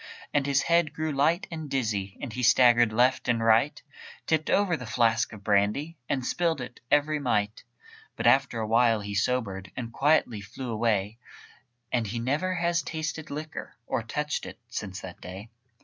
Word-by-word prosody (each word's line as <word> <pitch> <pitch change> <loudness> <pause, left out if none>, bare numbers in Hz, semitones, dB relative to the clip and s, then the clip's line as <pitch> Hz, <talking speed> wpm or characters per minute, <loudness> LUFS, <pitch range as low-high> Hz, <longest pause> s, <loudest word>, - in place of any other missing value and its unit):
And 145 -1 +1
his 140 -1 +2
head 170 -2 +2
grew 155 0 -2
light 150 +6 +2
and 160 -3 -6
dizzy, 110 -8 -2
And 120 - -6
he 125 - -3
staggered 120 -2 +5
left 125 +4 +2
and 120 -1 +2
right, 115 +6 +3 0.5
Tipped 155 -1 0
over 200 -4 +3
the 125 -6 -7
flask 115 -1 +2
of 105 -3 -11
brandy, 105 +11 +1
And 130 -2 -1
spilled 170 -1 0
it, 125 -1 -8
every 150 +1 +2
mite. 110 -5 -1 0.5
But - - -4
after 135 -3 +4
awhile 115 0 +3
he 100 0 -5
sobered, 100 -3 -1
And 115 -3 -5
quietly 135 -7 +2
flew 120 +5 -7
away, 110 -1 0 0.7
And 120 -3 0
he 115 +4 -4
never 145 +10 0
has 170 -1 +1
tasted 160 -1 -4
liquor, 155 +1 -6
Or - - -1
touched 150 +6 -3
it, - - -9
since 105 -5 -5
that 90 -2 -10
day. 95 +5 -9
125 Hz, 170 wpm, -27 LUFS, 110-150 Hz, 0.7 s, staggered